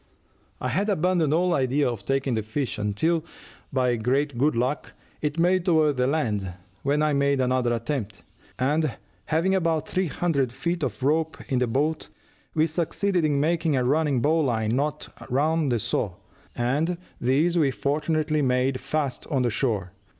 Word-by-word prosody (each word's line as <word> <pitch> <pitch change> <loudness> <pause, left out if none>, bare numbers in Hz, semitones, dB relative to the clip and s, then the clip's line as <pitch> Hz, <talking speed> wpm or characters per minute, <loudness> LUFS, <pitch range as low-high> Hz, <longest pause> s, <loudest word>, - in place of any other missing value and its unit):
"I 125 - -2
had 195 - 0
abandoned 180 -4 +2
all 175 +3 +2
idea 140 0 +2
of 115 -5 -3
taking 135 -1 0
the 110 - 0
fish, 110 +3 -3
until, 155 +11 0 0.5
by 125 -2 +1
great 135 +5 0
good 140 +4 +2
luck, 125 +5 -1 0.3
it 150 +1 -2
made 180 +2 +3
toward 155 -5 +3
the 125 0 +2
land, 105 - -1 0.3
when 145 +2 +1
I 155 -1 +2
made 140 0 +2
another 125 -1 +1
attempt, 115 -4 -3 0.3
and 150 +1 0 0.3
having 165 +5 +1
about 165 -4 +1
three 185 0 0
hundred 140 -6 0
feet 170 +7 -2
of 130 -2 -3
rope 155 +3 +1
in 130 - +2
the 125 - +1
boat, 150 +7 -1 0.5
we 155 0 +4
succeeded 175 +3 0
in 145 -2 +2
making 165 0 +1
a 130 - +1
running 145 -1 +2
bow 160 +3 +3
line 115 -6 +1
knot 150 +2 -1 0.2
round 150 +2 +1
the 120 - +2
saw, 110 -4 -2 0.4
and 145 +9 0 0.2
this 145 +8 +2
we 155 -5 +3
fortunately 155 +3 0
made 130 0 +1
fast 145 -3 -2
on 130 -5 +1
shore. 105 -6 -1
145 Hz, 165 wpm, -25 LUFS, 125-160 Hz, 0.5 s, we